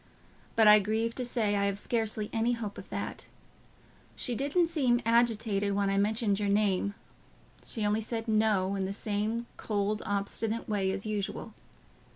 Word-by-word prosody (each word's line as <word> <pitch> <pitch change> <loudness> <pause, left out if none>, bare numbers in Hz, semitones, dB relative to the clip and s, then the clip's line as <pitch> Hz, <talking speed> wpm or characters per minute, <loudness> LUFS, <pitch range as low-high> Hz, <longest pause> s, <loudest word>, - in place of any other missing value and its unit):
But 220 -1 +5
I 210 0 +9
grieve 220 +3 -1
to 255 - -3
say 230 -4 0
I 200 0 +1
have 200 0 0
scarcely 215 -1 -1
any 230 +1 +1
hope 220 -4 -5
of - - -12
that. - - -5 0.9
She 245 - -2
didn't 285 +8 +2
seem 270 -8 +2
agitated 225 -3 +2
when 200 -1 +1
I 195 - +2
mentioned 210 0 +1
your 205 -1 0
name; 200 -1 +1 0.7
she 220 -4 -3
only 210 +2 +1
said 225 +1 -4
'No,' 215 -3 +2
in 195 -1 -1
the 195 - -3
same 215 +3 -2
cold, 210 0 -1
obstinate 205 +3 -2
way 200 -3 0
as 195 +2 -3
usual. 210 -2 -3
215 Hz, 165 wpm, -30 LUFS, 200-230 Hz, 0.9 s, I